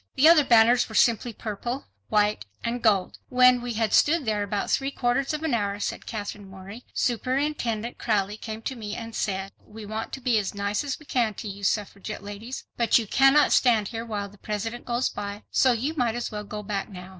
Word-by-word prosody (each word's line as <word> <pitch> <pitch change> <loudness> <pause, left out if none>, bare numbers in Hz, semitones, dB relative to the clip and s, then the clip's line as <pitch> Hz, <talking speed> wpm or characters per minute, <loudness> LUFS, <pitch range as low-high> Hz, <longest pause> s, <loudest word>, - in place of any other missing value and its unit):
The 290 - +6
other 325 -2 +8
banners 235 -1 +5
were 220 - -8
simply 235 +1 +3
purple, 230 +4 -5 0.2
white 210 - +1 0.2
and 235 +1 -2
gold. 200 -5 +2
"When 250 0 +5
we 240 -1 -4
had 225 -1 0
stood 310 -1 +4
there 215 -2 0
about 205 0 -2
three 270 0 +1
quarters 265 0 0
of 305 0 -3
an 315 -5 0
hour," 205 -3 0
said - - -4
Katherine 205 -2 -6
Morey, 195 +5 -11
"Superintendent 245 -2 -1
Crowley 205 -2 0
came 220 0 -7
to 265 - -3
me 215 -3 -5
and 230 -1 -7
said, 195 -2 -2
'We 215 0 -11
want 220 +2 -4
to - - -4
be 245 -4 +2
as 205 -1 -4
nice 200 +3 -1
as 280 -2 -3
we 305 - -17
can 235 -6 0
to 215 - -6
you 200 0 -7
suffragette 205 +1 -2
ladies, 205 +5 -7
but 235 -2 +4
you 230 - 0
cannot 270 +7 +5
stand 225 -5 +3
here 230 -1 -4
while 210 -3 -4
the 200 0 -18
President 225 +3 -4
goes 240 +1 0
by, 205 0 -6
so 260 - +4
you 250 +6 -1
might 240 -6 0
as 240 - -3
well 210 -1 -5
go 210 +1 -6
back 200 0 -3
now. 180 -2 -9
225 Hz, 215 wpm, -26 LUFS, 205-245 Hz, 0.2 s, other